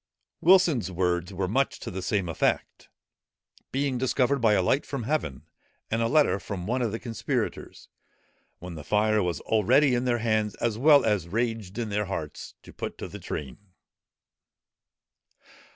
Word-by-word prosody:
Wilson's 165 - +4
words 90 0 -1
are 95 0 -2
much 130 +8 0
to - - -6
the 95 +1 -5
same 95 0 -1
effect; 85 - -1 0.8
"being 135 -2 -1
discovered 130 +1 +1
by 110 -3 +4
a 100 - +3
light 135 +10 +2
from 135 -4 -5
heaven, 110 - -2 0.5
and 115 +1 +1
a 115 - +2
letter 145 -6 +3
from 95 -4 -6
one 125 +5 -1
of 115 -3 0
the 115 - -3
conspirators, 115 -2 -4 0.7
when 90 0 -8
the 80 -3 -8
fire 105 +5 +2
was 90 -2 -2
already 125 +6 +3
in 120 +1 0
their 120 -1 +2
hands, 110 -3 0
as 115 -2 -1
well 145 +5 +5
as 105 -6 +1
raged 110 -1 -2
in 115 -2 -2
their 105 +1 -1
hearts, 80 -6 -6
to - - -14
put - - -6
to - - -6
the - - -9
train." 70 +3 -6
110 Hz, 165 wpm, -27 LUFS, 95-125 Hz, 0.8 s, well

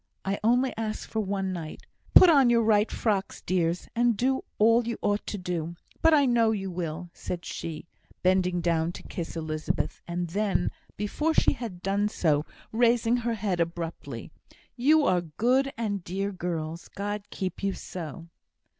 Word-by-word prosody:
I 195 +1 -1
only 245 +3 +3
ask 220 -1 -3
for 220 - -2
one 195 -2 -1
night. 165 -3 -7 0.3
Put 370 - +11
on 280 -7 +6
your 235 -1 +4
right 215 -1 +3
frocks, 205 -4 -1
dears, 175 -1 0
and 235 -2 +3
do 265 +4 +1
all 230 +2 +4
you 235 - -2
ought 205 0 0
to 210 - -3
do. 175 -2 -3 0.3
But 325 - +6
I 295 -3 +5
know 235 -3 +4
you 195 -3 -2
will," 170 0 -4
said 175 -1 -5
she, 160 -2 -5 0.4
bending 180 -1 +2
down 165 0 +1
to - - -9
kiss 170 -1 -5
Elizabeth, 155 -1 -2
and 175 0 -2
then, 200 +3 0 0.3
before 300 +11 0
she - - +4
had 195 -8 -7
done 200 +2 +1
so, 155 -6 +1 0.2
raising 235 +1 +3
her 235 -1 -1
head 195 -4 -1
abruptly. 165 -7 -4 0.4
"You 295 +4 +4
are 180 -1 +3
good 245 - +1
and 205 -5 -2
dear 195 +3 -2
girls 170 -3 -4
God 205 +1 -5
keep 190 -2 -4
you 195 -1 0
so!" 165 -3 -7
195 Hz, 165 wpm, -27 LUFS, 170-230 Hz, 0.4 s, Put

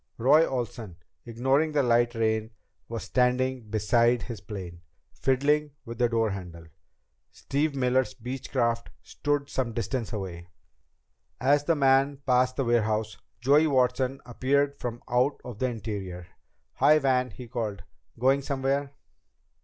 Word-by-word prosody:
Roy 145 +7 +5
Olsen, 120 -7 -4 0.3
ignoring 135 +6 +1
the 145 -2 +3
light 120 0 +2
rain, 110 -1 0 0.4
was 115 -1 -4
standing 125 -2 0
beside 115 +3 +2
his 115 -6 -7
plane, 95 -4 -8 0.3
fiddling 145 +3 +1
with 115 +1 -8
the 120 -1 +3
door 115 -2 +1
handle. 90 -4 -8 0.6
Steve 145 +1 -2
Miller's 130 -1 +1
Beechcraft 120 -1 -2 0.2
stood 145 -1 -2
some 130 -4 -2
distance 115 +1 -3
away. 90 -5 -6 0.9
As 145 +3 +3
the 165 - +3
man 135 0 +3
passed 130 0 +2
the 135 - -1
warehouse, 110 -2 +1 0.3
Joey 145 +5 +5
Watson 130 -1 +1
appeared 140 +4 +1
from 120 -1 -5
out 125 +3 +1
of 120 -4 -8
the 130 - +1
interior. 100 -6 -5 0.5
"Hi, 155 - +6
Van!" 130 -3 +1
he 120 +4 -10
called. 110 -4 -4 0.3
"Going 135 +4 +3
somewhere?" 140 +1 -1
125 Hz, 130 wpm, -27 LUFS, 115-135 Hz, 0.9 s, Hi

